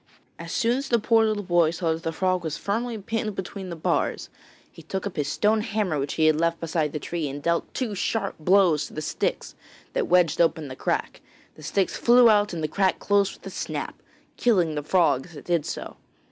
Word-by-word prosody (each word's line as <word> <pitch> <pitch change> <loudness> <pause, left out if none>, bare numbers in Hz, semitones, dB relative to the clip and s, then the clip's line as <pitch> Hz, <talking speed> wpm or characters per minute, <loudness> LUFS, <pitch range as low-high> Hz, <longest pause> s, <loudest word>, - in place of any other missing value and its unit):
As - - -7
soon 235 0 +1
as 275 - -5
the 235 - +4
poor 225 0 +3
little 215 -1 -1
boy 175 -3 +3
saw 165 0 -1
that 160 - -6
the 165 - -2
frog 185 +1 0
was 160 -2 -3
firmly 230 +3 -2
pinned 215 0 -3
between 190 0 -6
the 170 - -5
bars, 160 - -1 0.4
he - - -13
took 190 +5 -5
up 200 - -5
his 145 -2 -1
stone 215 +8 +2
hammer 205 -8 -1
which 140 +1 -3
he 160 - +2
had 155 0 +4
left 170 0 +1
beside 160 -2 -1
the - - -3
tree 160 0 -3
and 140 +1 -7
dealt 170 0 0
two 245 -5 -2
sharp 200 +1 -1
blows 170 -3 +3
to - - -15
the 155 - -3
sticks - - -2 0.4
that - - 0
wedged 175 -3 +3
open 160 -3 +1
the 130 - -7
crack. - - -2 0.3
The - - -16
sticks 185 +5 -1
flew 240 -1 +6
out 210 0 +3
and 165 -3 -4
the - - +1
crack 190 +4 +1
closed 200 -1 +1
with - - -20
a - - -6
snap, - - -5 0.4
killing 180 -10 +2
the 150 - -2
frog 160 -3 +2
as 175 - -15
it 145 - -11
did 170 -4 0
so. - - -6
180 Hz, 225 wpm, -25 LUFS, 160-205 Hz, 0.4 s, flew